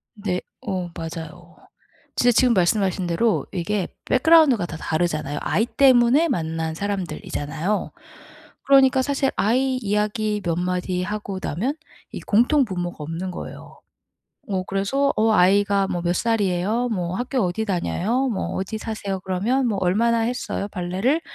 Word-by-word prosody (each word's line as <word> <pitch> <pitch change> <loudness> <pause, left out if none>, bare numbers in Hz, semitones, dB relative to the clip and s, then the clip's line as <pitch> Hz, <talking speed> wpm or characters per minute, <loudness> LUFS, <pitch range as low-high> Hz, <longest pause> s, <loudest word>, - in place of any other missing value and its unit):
네. 195 -3 -2 0.2
어 185 -4 -3
맞아요. 165 -1 -8 0.6
진짜 245 0 +4
지금 245 0 +4
말씀하신 190 0 +1
대로 210 +6 +1
이게 190 +2 -2 0.2
백그라운드가 275 - +5
다 160 - -7
다르잖아요. 155 -3 -2
아이 220 - +1
때문에 260 +4 +4
만난 160 -6 -2
사람들이잖아요. 180 -1 -3 0.7
그러니까 265 -1 +5
사실 275 0 0
아이 255 +4 +2
이야기 210 -1 -1
몇 170 -2 0
마디 180 0 -1
하고 205 -1 -4
나면 230 - -2 0.4
이 - - -6
공통 245 +6 +3
분모가 175 -3 -4
없는 165 +4 -4
거예요. - - -9 0.7
어 185 -2 -1
그래서 205 +9 0
"어 220 +1 +3
아이가 200 0 +3
뭐 175 - -2
몇 175 0 0
살이에요? 220 +2 0
뭐 180 -4 -2
학교 250 +2 -2
어디 185 +4 -1
다녀요? 210 +7 0
뭐 205 - -3
어디 195 +4 -3
사세요? 205 -3 -4
그러면 215 +9 0
뭐 205 -3 -1
얼마나 230 +6 +2
했어요? 235 -3 -2
발레를?" 195 - -1
200 Hz, 320 characters per minute, -23 LUFS, 180-235 Hz, 0.7 s, 백그라운드가